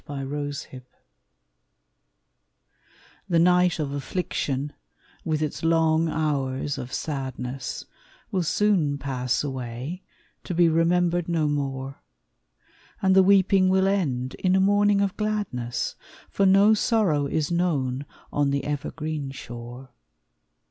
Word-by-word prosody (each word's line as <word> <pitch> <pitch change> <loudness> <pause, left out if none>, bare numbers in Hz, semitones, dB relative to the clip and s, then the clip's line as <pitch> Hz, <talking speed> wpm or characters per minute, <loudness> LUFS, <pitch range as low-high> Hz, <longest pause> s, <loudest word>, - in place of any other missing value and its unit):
JOY 145 - -6
IN 135 - -5
THE 145 - -4
MORNING 145 -2 -5 2.5
The 170 - +3
night 180 +1 +4
of 150 -3 -2
affliction, 145 -1 -3 0.5
with 155 -1 -1
its 150 - -3
long 165 0 +3
hours 145 -3 -1
of 125 - -7
sadness, 130 -3 -4 0.5
Will 185 - +1
soon 170 -5 +1
pass 130 -3 -1
away 130 +5 -5 0.4
to 180 - -4
be 170 -1 +5
remembered 175 +1 +2
no 160 -3 +1
more; 135 -2 -3 1.0
And 190 0 +4
the 190 - +8
weeping 190 -1 +4
will 190 0 +3
end 135 -11 0
in 185 0 +2
a - - +4
morning 205 +1 +3
of 200 -2 0
gladness; 200 - -2 0.4
For 195 - +2
no 200 +3 +6
sorrow 200 -10 +2
is 155 +2 -1
known 145 -6 0 0.3
on 145 -1 +2
the 140 0 -1
evergreen 150 0 -4
shore. 120 0 -9
155 Hz, 120 wpm, -25 LUFS, 135-180 Hz, 2.5 s, the